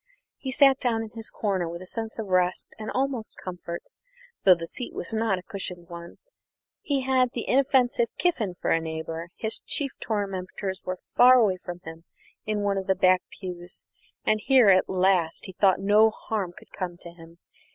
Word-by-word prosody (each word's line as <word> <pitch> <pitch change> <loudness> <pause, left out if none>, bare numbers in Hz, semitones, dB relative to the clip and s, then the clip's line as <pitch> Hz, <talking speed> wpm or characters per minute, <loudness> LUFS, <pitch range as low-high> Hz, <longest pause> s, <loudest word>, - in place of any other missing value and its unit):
He 265 - -5
sat 270 0 +5
down 230 -3 0
in 220 - -9
his 225 -1 -6
corner 190 -5 -1
with 170 +2 -7
a - - -11
sense 225 +3 -5
of 220 - -3
rest 180 -1 0
and 215 - -5
almost 260 -4 -2
comfort, 175 -2 -6 0.6
though 185 -2 +8
the 170 -1 -6
seat 245 +8 -5
was - - 0
not 220 -3 +1
a 180 - -8
cushioned 180 -3 -6
one. 170 0 -9 0.7
He 280 -3 0
had 255 -1 +2
the 235 - -4
inoffensive 255 -2 +3
Kiffin 230 - 0
for - - -1
a 165 - +3
neighbour, 160 +1 -5
his 220 0 -1
chief 280 -2 -1
tormentors 195 -2 -3
were 185 0 -3 0.2
far 250 +1 +8
away 210 -7 +3
from 175 -1 -7
him 165 +1 -10 0.4
in 210 -1 0
one 200 -1 +1
of 190 - -7
the 190 - +3
back 185 0 +4
pews, 180 -2 -8 0.4
and 215 0 +2
here 255 -6 +6
at 185 -1 +4
least 185 -3 +2
he 190 - -7
thought 190 0 +3
no 210 +3 +5
harm 215 -4 -4
could - - -16
come 175 -2 -5
to 170 -1 -11
him. 165 0 -15
195 Hz, 190 wpm, -26 LUFS, 180-230 Hz, 0.7 s, though